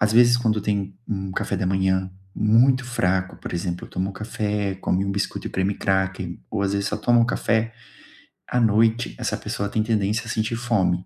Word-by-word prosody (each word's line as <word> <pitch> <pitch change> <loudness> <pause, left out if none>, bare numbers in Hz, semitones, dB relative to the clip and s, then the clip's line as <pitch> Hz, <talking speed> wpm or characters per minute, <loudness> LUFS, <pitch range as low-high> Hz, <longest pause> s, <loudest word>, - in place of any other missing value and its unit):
Às 105 +1 +3
vezes, 120 +1 +6
quando 110 -3 +1
tem 100 -2 -2
um 95 -2 -3
café - - -2
da 95 - -1
manhã 95 0 +1 0.2
muito 125 +5 +4
fraco. 95 -6 0
Por - - -8
exemplo, 85 0 -3
tomou 95 +2 -3
café, 105 -1 -2
come 95 0 0
um 100 - -1
biscoito 100 - -3
de - - -13
cream 95 +2 0
cracker 95 -2 -1
ou, 105 -2 -1
às 100 - 0
vezes, 100 0 0
só - - -2
toma 120 0 +3
um 115 - +4
café. 115 -1 0 0.7
À 125 - +1
noite, 110 - +3
essa - - -1
pessoa 100 - -3
tem 110 +1 0
tendência 110 0 0
a 110 - -7
sentir 110 +1 -1
fome, 95 -7 +1
100 Hz, 195 wpm, -23 LUFS, 95-115 Hz, 0.7 s, vezes